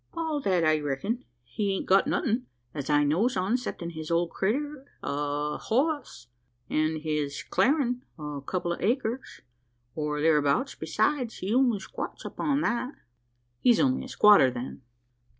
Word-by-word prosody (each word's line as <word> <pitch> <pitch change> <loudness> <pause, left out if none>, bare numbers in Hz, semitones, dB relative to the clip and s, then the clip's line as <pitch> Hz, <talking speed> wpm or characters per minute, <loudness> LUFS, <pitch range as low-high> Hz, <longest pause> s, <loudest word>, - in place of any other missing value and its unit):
"All 320 -3 -1
that 185 -7 +2
I 155 -1 +3
reckon. 150 - -2 0.2
He 195 - -2
hain't 195 - -3
got 190 +1 +4
nothin', 235 +3 0 0.3
as 140 -3 -5
I 145 0 +4
knows 185 - +2
on, 190 +6 +1
'ceptin' 175 -9 -4
his 155 -1 -7
old 170 0 +1
critter 275 +8 -1 0.2
o' 145 +1 -1
a - - -4
hoss, 275 - -1 0.5
an' 155 0 +1
his 150 -2 -2
clarin' 250 - +2 0.2
o' 150 -2 -5
a - - -6
couple 175 +4 -2
o' - - -5
acres 240 +3 -1 0.5
or 150 -1 -2
thereabout; 150 - +2
besides, 255 -6 0
he 195 +4 -2
only 250 -3 +4
squats - - -7
upon 290 -2 -1
that." 250 +1 -1 0.6
"He's 240 - +4
only 260 -1 +2
a - - -8
squatter, 210 - +6
then?" 125 +2 -6
190 Hz, 155 wpm, -28 LUFS, 150-250 Hz, 0.6 s, squatter